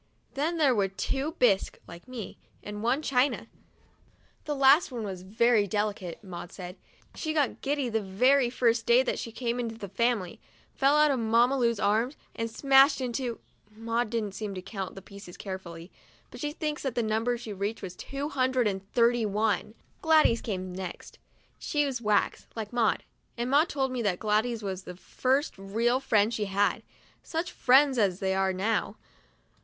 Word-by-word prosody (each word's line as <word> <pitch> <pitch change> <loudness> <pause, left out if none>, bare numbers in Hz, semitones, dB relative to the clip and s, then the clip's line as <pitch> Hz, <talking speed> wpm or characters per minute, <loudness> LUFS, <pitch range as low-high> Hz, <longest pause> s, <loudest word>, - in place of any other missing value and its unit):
Then 315 +5 -1
there 290 -5 +4
were 200 -4 +2
two 270 +10 -3
bisque 200 -6 +2
(like 170 +6 -12
me) 250 -4 -8 0.2
and 210 0 -6
one 240 +4 +2
all - - -6
china. 270 0 +1 1.0
The 295 - -2
last 275 +3 +5
one 235 -3 -4
was 190 -3 -5
very 215 +2 +2
delicate, 205 -3 -3
Maud 175 -2 -8
said. 180 -1 -8 0.4
She 315 -1 -3
got 295 -4 0
giddy 280 -1 -1
the 225 -2 -1
very 245 +7 +3
first 235 -2 +1
day 240 +2 +6
that - - -2
she 230 - -5
came 240 +1 -2
into 230 -2 -3
the 205 - -7
family, 200 -1 -1 0.3
fell 275 +2 +3
out 300 -1 +5
of 265 - 0
Mamma 235 +4 +3
Lu's 235 -4 +1
arms, 220 +7 +1 0.2
and 230 -1 -3
smashed 275 +4 +5
into 245 -1 -3 0.2
— 210 - -35
Maud 230 +1 -1
didn't 215 -4 -3 0.3
count 195 -2 -5
the 195 - -10
pieces 200 -2 -12
carefully, 180 -3 -8 0.4
but - - -10
she 295 -1 -2
thinks 300 -1 -3
that 265 -4 -3
the 240 - +1
number 225 +3 0 0.2
reached 200 -2 -5
two 275 +1 -4
hundred 255 -3 +1
and 195 -1 -4
thirty 235 -1 +3
one. 210 +1 -1 0.3
Gladys 310 -7 +4
came 185 -4 -4
next; 185 -1 -8 0.4
she's 280 -5 -1
wax, 210 -2 +1
like 220 0 -5
Maud, 235 -3 +1 0.3
and 240 +2 -2
Maud 300 +5 +4
told 265 -2 -1
me 255 -2 -2
that 200 -5 0
Gladys 220 +2 0
was 190 -2 -4
the 180 - -8
first 265 - -1
real 230 +6 +1
friend 220 -4 +2
she 215 -2 -1
had. 200 +1 +1 0.4
Such 335 +1 -3
friends 265 0 +4
as 195 -4 +1
they 190 0 0
are 190 0 +1
now! 195 +5 -1
230 Hz, 175 wpm, -28 LUFS, 200-260 Hz, 1.0 s, day